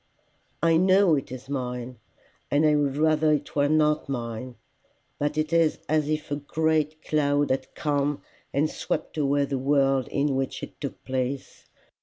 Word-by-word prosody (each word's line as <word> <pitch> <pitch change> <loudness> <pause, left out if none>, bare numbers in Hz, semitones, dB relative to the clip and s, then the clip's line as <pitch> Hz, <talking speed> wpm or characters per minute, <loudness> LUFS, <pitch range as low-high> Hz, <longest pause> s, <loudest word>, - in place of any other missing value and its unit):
I 165 -1 +5
know 185 0 +5
it 140 -4 -1
is 130 0 -8
mine, 125 -3 -4 0.5
and 150 +2 +3
I 150 -1 +4
would 145 -2 0
rather 155 0 +3
it 150 - -3
were 145 0 +3
not 150 -1 +2
mine, 120 -1 -4 0.6
but 145 +1 -1
it 155 +1 -1
is 165 -2 +3
as 155 -1 +1
if 155 -1 -2
a 145 - 0
great 155 +1 0
cloud 145 -2 +1
had 130 0 -2
come 145 -1 -1 0.3
and 145 +3 +2
swept - - -4
away 140 0 +2
the 135 -1 -2
world 135 -1 +2
in 140 0 0
which 135 0 -2
it - - -9
took - - -6
place. 130 +1 -4
145 Hz, 165 wpm, -26 LUFS, 135-155 Hz, 0.6 s, I